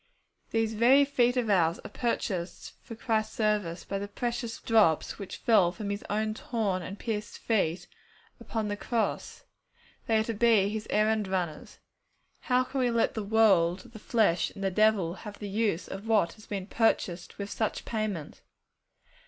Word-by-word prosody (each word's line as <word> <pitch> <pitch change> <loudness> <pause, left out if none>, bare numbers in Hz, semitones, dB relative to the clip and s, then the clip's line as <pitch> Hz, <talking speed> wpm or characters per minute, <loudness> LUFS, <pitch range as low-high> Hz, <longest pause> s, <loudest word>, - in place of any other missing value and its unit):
These 225 -1 0
very 255 +6 +5
feet 245 -3 +2
of 245 -2 +1
ours 175 -5 +3
are - - -8
purchased 190 -7 -3
for 230 - -9
Christ's 220 -2 -1
service 210 -6 0
by 195 - -3
the 200 - -4
precious 235 +2 -4
drops 215 -9 +2
which 200 - -7
fell 195 -7 +4
from 200 +3 -5
His 200 - -4
own 215 +1 0
torn 215 -5 -2
and 190 +4 -7
pierced 215 -2 -4
feet 180 -6 0 0.5
upon 220 -2 -3
the 205 - -2
cross. 225 +2 -2 0.6
They 225 - +3
are 220 - +2
to 230 - -3
be 220 -3 +4
His 215 0 -4
errand 215 0 +2
runners. 180 -5 -3 0.6
How 250 0 +2
can 265 +1 -4
we 250 -1 +2
let 230 -1 +1
the 220 - -3
world, 195 -4 +3
the 220 - -9
flesh, 205 -7 +2
and 195 - -9
the 195 - +1
devil 210 -4 +3
have 205 +2 -9
the 205 - -6
use 200 -3 -1
of 195 +3 -7
what 210 -7 +2
has 215 - -17
been 195 -3 -4
purchased 190 -5 0
with 200 0 -5
such 220 - -2
payment? 215 -9 -4
215 Hz, 170 wpm, -29 LUFS, 195-225 Hz, 0.6 s, very